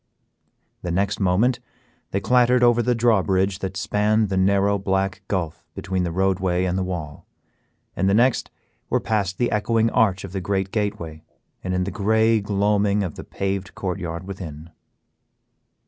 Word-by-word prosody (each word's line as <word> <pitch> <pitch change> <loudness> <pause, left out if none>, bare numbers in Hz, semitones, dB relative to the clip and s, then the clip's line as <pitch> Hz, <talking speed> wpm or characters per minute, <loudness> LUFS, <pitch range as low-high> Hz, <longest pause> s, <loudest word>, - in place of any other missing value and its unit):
The 90 - -4
next 95 +3 0
moment 105 +7 +2 0.5
they 100 - -1
clattered 125 +3 +3
over 120 0 +5
the 120 +1 +1
drawbridge 95 -4 +2
that 95 -1 -4
spanned 105 +2 +1
the 95 - -1
narrow 100 +1 +2
black 95 0 -1
gulph 85 -6 -3
between 95 0 -2
the 85 -1 -1
roadway 95 0 +1
and 90 -1 -1
the 95 - 0
wall, 85 -5 -6 0.7
and 95 +2 +1
the 100 - +3
next 125 +3 +2 0.4
were - - +2
past 100 -4 -1
the 120 - 0
echoing 115 +1 +1
arch 95 -4 +2
of 95 - -7
the 95 0 -3
great 95 +1 -1
gateway 100 -7 -3 0.4
and 90 0 -2
in 90 - +1
the 100 - -3
gray 110 +2 +2
gloaming 100 0 +1
of 90 -5 -4
the - - -9
paved 95 -1 -4
court 95 -2 -3
yard 85 0 -5
within. 85 -5 -8
95 Hz, 165 wpm, -23 LUFS, 90-105 Hz, 0.7 s, over